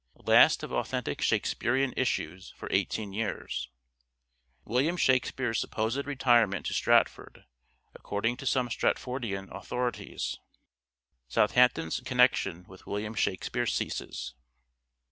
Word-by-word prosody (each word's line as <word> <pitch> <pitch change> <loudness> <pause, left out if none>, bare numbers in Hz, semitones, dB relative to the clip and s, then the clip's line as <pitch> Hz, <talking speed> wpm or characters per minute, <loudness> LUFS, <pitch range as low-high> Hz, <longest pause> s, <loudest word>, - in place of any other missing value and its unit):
Last - - +6
of - - -6
authentic - - -2
Shakespearean 130 +2 +1
issues 95 -8 -2
for - - -7
18 105 -3 -1
years. 100 - -3 1.0
William 135 +10 +1
Shakspere's 130 -4 +1
supposed 115 +6 -2
retirement 120 - +2
to - - -2
Stratford - - +1 0.5
(according 115 +4 -2
to 135 - -6
some 125 -1 +2
Stratfordian 115 -6 -2
authorities). 125 -1 -3 0.9
Southampton's 60 - +3
connection 90 -2 +2
with 95 0 -15
William 105 +2 -3
Shak 95 -4 -1
spere 120 0 -1
ceases. 65 - -3
115 Hz, 105 wpm, -29 LUFS, 95-125 Hz, 1.0 s, Last